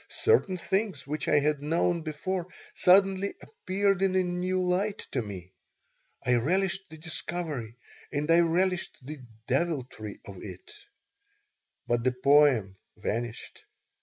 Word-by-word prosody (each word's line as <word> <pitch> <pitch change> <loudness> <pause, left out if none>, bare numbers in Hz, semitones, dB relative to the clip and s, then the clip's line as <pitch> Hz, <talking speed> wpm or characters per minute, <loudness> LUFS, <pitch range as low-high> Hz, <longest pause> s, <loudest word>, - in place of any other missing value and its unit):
Certain 210 - +2
things 190 -5 -1
which 150 0 -4
I - - +4
had 145 0 +1
known 165 +3 +1
before 170 +4 -3 0.3
suddenly 195 - +4
appeared 195 - -1
in 190 -1 +2
a 185 - +4
new 180 +1 -1
light 185 +3 0
to 130 - 0
me. 95 -4 -8 0.7
I 125 0 +4
relished 190 +8 0
the 160 - -11
discovery 155 -7 -4 0.4
and 150 +3 0
I 165 - +6
relished 175 +2 +1
the 150 +3 -7 0.3
deviltry 130 -7 -2
of 100 -1 -9
it. 95 -3 -10 1.1
But 120 -1 0
the 130 0 +2
poem 125 -7 +4 0.2
vanished. 115 +2 -4
160 Hz, 130 wpm, -28 LUFS, 125-185 Hz, 1.1 s, I